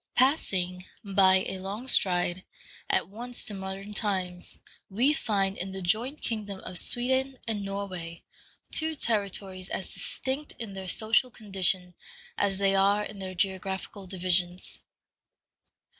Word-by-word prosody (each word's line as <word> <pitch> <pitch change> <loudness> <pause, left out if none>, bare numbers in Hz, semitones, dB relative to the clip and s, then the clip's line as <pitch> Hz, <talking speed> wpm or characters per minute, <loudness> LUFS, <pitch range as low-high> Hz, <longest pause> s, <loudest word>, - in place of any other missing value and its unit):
Passing, 185 - +2 0.2
by 190 -2 +4
a 190 - -4
long 200 +7 -5
stride, 180 -5 +2 0.5
at - - +2
once 240 +5 -5
to 210 - +3
modern 195 +1 -6
times, 185 -4 -2 0.3
we 245 +9 +3
find 195 -8 +1
in 190 +1 -4
the 190 - -5
joint 235 - +1
kingdom 210 -4 -2
of 180 - -4
Sweden 260 +2 +1
and 215 -3 -1
Norway 185 -4 -5 0.5
two 315 0 +4
territories 200 -6 -1
as 190 - -3
distinct 270 +3 -2
in 225 -4 -5
their 190 -1 -6
social 220 +6 +4
condition 190 -5 +1 0.4
as 195 -1 +1
they 195 0 +3
are 200 +2 +4
in 210 -1 -7
their 185 -1 -5
geographical 190 +1 -2
divisions. 180 -1 0
195 Hz, 130 wpm, -28 LUFS, 185-220 Hz, 0.5 s, by